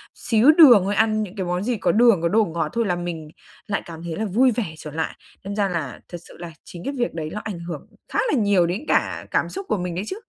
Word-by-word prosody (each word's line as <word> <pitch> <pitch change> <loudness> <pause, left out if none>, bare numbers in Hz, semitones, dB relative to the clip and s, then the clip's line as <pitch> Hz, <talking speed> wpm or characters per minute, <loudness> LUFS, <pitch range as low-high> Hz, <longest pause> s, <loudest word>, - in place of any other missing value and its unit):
xíu 230 +6 +4
đường 290 - +8
thôi, 200 +2 -1
ăn 215 0 +2
những 195 -1 -8
cái 190 -3 -3
món 180 +1 -2
gì 240 +1 -1
có 190 - +1
đường, 230 -5 +4
có 170 - +2
đồ 220 +3 +3
ngọt 165 -3 -2
thôi 230 -1 0
là 180 -4 0
mình 175 -3 -5 0.4
lại 200 - -1
cảm 165 -1 -9
thấy 170 -2 -4
là 220 - -2
vui 240 +6 +3
vẻ 235 -1 -2
trở 150 - -8
lại. 160 +2 -3 0.3
Đâm 200 +1 -5
ra 200 -2 +1
là 160 -8 -4
thật 175 - -6
sự - - -15
là 170 -1 -8
chính 175 -1 -11
cái 280 - -2
việc 240 - -1
đấy 160 -2 -4
ló 210 - -4
ảnh 200 -5 -5
hưởng 170 -3 -7 0.2
khá - - -2
là - - +2
nhiều 200 -4 +3
đến 190 - -4
cả - - 0
cảm - - +1
xúc 390 +1 -6
của - - +1
mình 180 -2 -4
đấy 185 - -2
chứ. 385 - -5
195 Hz, 280 wpm, -22 LUFS, 170-225 Hz, 0.4 s, đường